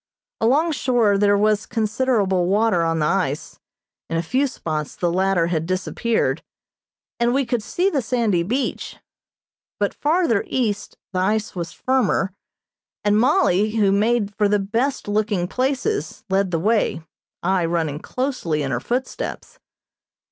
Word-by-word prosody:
Along 290 +9 +3
shore 245 -7 +2
there 205 0 +4
was 210 0 +2
considerable 215 -5 +1
water 205 -2 +2
on 165 0 +1
the 155 - +1
ice, 150 -5 -1 0.5
in 165 - -1
a 165 - 0
few 260 +11 +1
spots 155 - -4
the 175 -1 0
latter 190 -2 +2
had 165 -1 -1
disappeared, 190 +5 0 0.8
and 240 +1 +2
we 275 -1 +2
could 235 -1 -1
see 355 - 0
the 300 -9 +1
sandy 220 -6 +1
beach, 245 +10 -2 0.8
but - - 0
farther 300 - +1
east 215 -6 -2 0.2
the 185 - 0
ice 210 +3 0
was 170 -2 -4
firmer, 245 -7 0 0.7
and 210 0 +3
Mollie, 220 - +3
who 205 -3 +3
made 210 0 +1
for 205 0 +1
the 210 - +3
best 230 +8 -1
looking 205 -3 0
places, 270 - -2
led 195 0 +2
the 170 - 0
way, 210 -2 +1 0.4
I 185 -1 +2
running 165 -3 -1
closely 250 - -2
in 135 - -2
her 125 - 0
footsteps. 250 - -4
210 Hz, 145 wpm, -22 LUFS, 180-245 Hz, 0.8 s, there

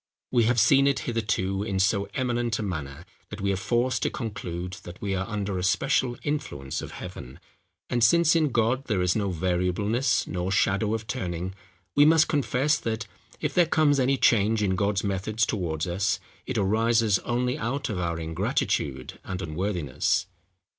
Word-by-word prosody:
We 120 -3 +3
have 120 +1 +3
seen 135 +4 +5
it 140 -1 +1
hitherto 105 -5 -1
in 100 -2 -2
so 100 +1 +2
eminent 120 -3 0
a - - -3
manner, 80 -4 -5 0.2
that 105 - -7
we 100 0 0
are - - +1
forced 120 +6 0
to - - +1
conclude 90 -4 -5
that 90 +1 -10
we 100 -2 -2
are 95 0 -2
under 100 -3 -2
a - - -3
special 100 +6 +1
influence 70 - -3
of - - -8
heaven: 65 +2 -9 0.5
and 120 -1 0
since 170 +6 +5
in 155 -3 +3
God 120 +2 +1
there 100 -6 0
is 90 0 +2
no 100 -3 0
variableness, 95 - 0
nor 90 0 -3
shadow 100 +2 +2
of 110 0 -5
turning, 95 -6 -3 0.4
we 145 - +7
must 160 0 +5
confess 145 0 +1
that, 115 0 -3 0.4
if 150 -2 -1
there 175 0 +4
comes 150 -3 +3
any 135 +1 +2
change 110 -2 +3
in 95 -2 +1
God's 100 +1 0
methods 105 +3 0
towards 85 -7 -2
us, 95 +3 0 0.3
it - - -2
arises 110 +1 +2
only 125 +1 -1
out 135 +2 -2
of 100 -4 -3
our 85 -2 -2
ingratitude 75 -4 -2
and 95 -1 -5
unworthiness." 85 -5 -1
105 Hz, 175 wpm, -26 LUFS, 90-120 Hz, 0.5 s, we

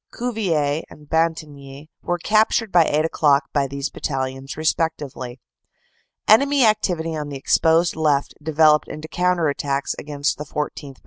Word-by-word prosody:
Cuvillers 170 -11 -1
and 150 0 -15
Bantigny 150 -3 -2
were 175 - -1
captured 215 +3 +1
by 170 -2 +5
eight 155 +1 +1
o - - -1
clock 145 -3 +3
by 140 -2 +1
these 140 +2 -4
battalions 135 0 -4
respectively. 145 -6 -2 0.9
Enemy 275 +4 +5
activity 175 -7 0
on 150 -1 -4
the 140 - -5
exposed 165 +5 +2
left 150 -3 +1
developed 155 0 +3
into 155 +1 -8
counter 180 -1 +1
attacks 140 -1 -2
against 145 -1 -2
the - - -3
14th. 145 -2 -5
155 Hz, 140 wpm, -21 LUFS, 140-170 Hz, 0.9 s, by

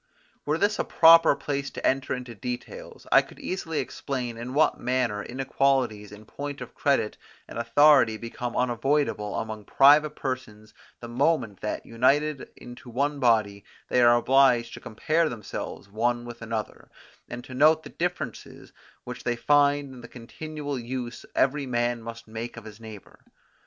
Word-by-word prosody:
Were 150 +2 +1
this 205 +4 +1
a - - +2
proper 165 -2 +6
place 140 0 -3
to - - -7
enter 135 0 0
into 125 -2 -8
details, 125 +3 -7
I - - +7
could - - -16
easily 165 -4 -4
explain 125 -4 -4
in 120 +3 -7
what 155 - +3
manner 125 -4 -1
inequalities 130 -4 -1
in 105 +1 -12
point 145 +4 -7
of - - -9
credit 140 -7 0 0.3
and - - -7
authority 120 -1 +5
become 120 +1 -6
unavoidable 125 -3 0
among 110 -1 -5
private 150 +5 +5
persons 110 -5 -6 0.3
the 120 - -7
moment 120 - 0
that, 105 - -4
united 140 +5 +1
into 120 0 -12
one 140 +4 -1
body, 110 -5 +2 0.3
they 125 - +3
are 120 0 +6
obliged 125 -1 +3
to - - -8
compare 155 +9 0
themselves 110 -4 -7
one 120 +4 -1
with 120 -1 -10
another, 110 -2 -5 0.4
and 120 +1 -7
to 130 - -11
note 155 +4 +4
the - - -10
differences 175 +1 -5 0.3
which - - -8
they 120 -1 0
find 145 +1 +2
in 125 - -11
the - - -10
continual 145 +3 -7
use 120 0 -6
every 140 +1 +1
man 120 -1 -1
must 115 0 -9
make 115 +2 -7
of 115 - -10
his 110 0 -11
neighbour. 110 -3 -12
125 Hz, 160 wpm, -26 LUFS, 115-145 Hz, 0.4 s, I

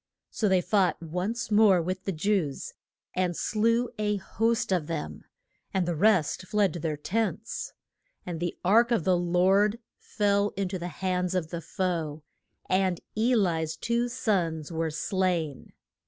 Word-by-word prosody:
So 215 - 0
they 185 -1 +4
fought 195 0 +2
once 185 +8 -3
more 205 -3 +6
with 185 +3 -3
the 195 - 0
Jews, 170 -4 -1 0.4
and 180 -2 0
slew 230 +3 +1
a 210 -1 +1
host 225 +2 0
of 175 -5 +1
them, 75 - -5 0.5
and 185 -2 +1
the 175 - 0
rest 185 -1 +2
fled 210 -2 +2
to 175 - -5
their 155 -1 -2
tents. 220 +9 -2 0.5
And 175 -3 -4
the 175 0 -3
ark 230 +5 +5
of 235 -8 +1
the 185 +1 +3
Lord 185 +5 +3 0.2
fell 205 -1 +1
in 195 -2 -1
to 185 -1 -4
the 175 - -4
hands 180 +1 -1
of 160 -3 -2
the 170 -1 -4
foe, 165 -5 -2 0.4
and 185 -2 +1 0.2
E 235 +4 +3
li's 165 -7 +1
two 235 +4 0
sons 175 - -1
were 165 0 -1
slain. 165 -2 -1
185 Hz, 155 wpm, -28 LUFS, 170-210 Hz, 0.5 s, more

